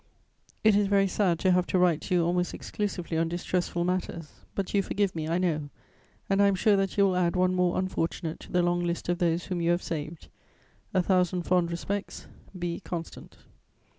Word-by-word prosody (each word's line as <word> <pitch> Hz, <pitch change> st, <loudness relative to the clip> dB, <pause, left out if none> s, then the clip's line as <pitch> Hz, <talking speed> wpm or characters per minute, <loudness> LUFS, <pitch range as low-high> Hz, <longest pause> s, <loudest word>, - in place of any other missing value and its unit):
It 215 Hz, -2 st, +5 dB
is 205 Hz, 0 st, +3 dB
very 195 Hz, 0 st, +3 dB
sad 185 Hz, -2 st, +1 dB
to 185 Hz, -, +3 dB
have 180 Hz, 0 st, +2 dB
to -, -, +1 dB
write 175 Hz, -3 st, +3 dB
to 185 Hz, -, -1 dB
you 170 Hz, -2 st, +3 dB
almost 175 Hz, +1 st, 0 dB
exclusively 180 Hz, -5 st, -3 dB
on 165 Hz, 0 st, +1 dB
distressful 175 Hz, 0 st, -1 dB
matters; 175 Hz, -3 st, -3 dB, 0.2 s
but 195 Hz, -2 st, -3 dB
you 200 Hz, -, +4 dB
forgive 195 Hz, -1 st, -1 dB
me, 155 Hz, -1 st, -3 dB
I 165 Hz, +2 st, +1 dB
know, 155 Hz, -5 st, -1 dB, 0.6 s
and 195 Hz, 0 st, +2 dB
I 200 Hz, -, +6 dB
am 200 Hz, -, +2 dB
sure 205 Hz, +2 st, +3 dB
that 195 Hz, 0 st, -1 dB
you 200 Hz, -, +5 dB
will 190 Hz, -2 st, +2 dB
add 175 Hz, -1 st, +1 dB
one 185 Hz, 0 st, +2 dB
more 180 Hz, -1 st, +1 dB
unfortunate 170 Hz, -3 st, -2 dB
to -, -, -13 dB
the 180 Hz, 0 st, +2 dB
long 175 Hz, 0 st, +1 dB
list 170 Hz, 0 st, -3 dB
of 175 Hz, 0 st, 0 dB
those 170 Hz, 0 st, +1 dB
whom 180 Hz, -3 st, -3 dB
you 170 Hz, -, +1 dB
have 175 Hz, +1 st, +1 dB
saved. 155 Hz, 0 st, -5 dB, 0.6 s
"A 185 Hz, -1 st, +2 dB
thousand 180 Hz, -1 st, +1 dB
fond 180 Hz, -1 st, +2 dB
respects. 195 Hz, +4 st, -4 dB, 0.3 s
"B. 175 Hz, -1 st, -3 dB
CONSTANT. 165 Hz, -2 st, -7 dB
180 Hz, 205 wpm, -28 LUFS, 170-190 Hz, 0.6 s, I